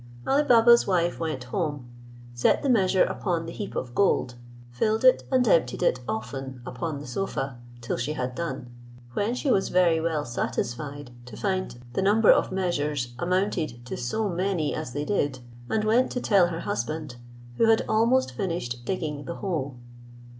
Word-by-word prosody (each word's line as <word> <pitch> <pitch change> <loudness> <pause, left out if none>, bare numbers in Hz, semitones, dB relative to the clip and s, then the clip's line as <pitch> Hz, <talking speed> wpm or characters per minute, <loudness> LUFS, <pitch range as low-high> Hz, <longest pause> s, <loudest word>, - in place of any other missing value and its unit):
Ali 280 +2 +3
Baba's 235 -2 +6
wife 175 -3 +1
went 155 -6 -3
home, 145 -1 -3 0.5
set 120 - +2
the 280 - +1
measure 190 -5 +4
upon 170 -3 -1
the 165 - -6
heap 205 +3 -6
of 120 -2 -4
gold, 130 -9 +2 0.4
filled 215 - 0
it 255 - +6
and 255 -2 +3
emptied 145 - +2
it 130 - +2
often 130 +3 -4
upon 145 +5 -4
the 145 - -8
sofa, 135 -3 -3 0.2
till 120 - -2
she 125 +5 -2
had 130 -3 -3
done: 130 -5 -5 0.4
when 210 - 0
she 270 +1 0
was 195 - +2
very 170 -3 +3
well 160 -3 -1
satisfied 140 +3 -4 0.2
to 110 -4 -9
find 185 -11 -2
the - - 0
number 205 +3 +5
of - - +3
measures 150 -9 -1
amounted 175 -9 -1
to - - -5
so 205 - -1
many 180 -4 -1
as 155 -6 -5
they 145 +1 -2
did, 145 -9 0 0.3
and 215 - +1
went 230 +4 +3
to 250 - -1
tell 195 -7 +4
her 165 -1 -4
husband, 155 -9 -3 0.4
who - - +4
had 225 - +4
almost 235 +4 +3
finished 165 - -3
digging 150 -5 -3
the 170 - -5
hole. 150 -9 -3
165 Hz, 170 wpm, -26 LUFS, 130-200 Hz, 0.5 s, Baba's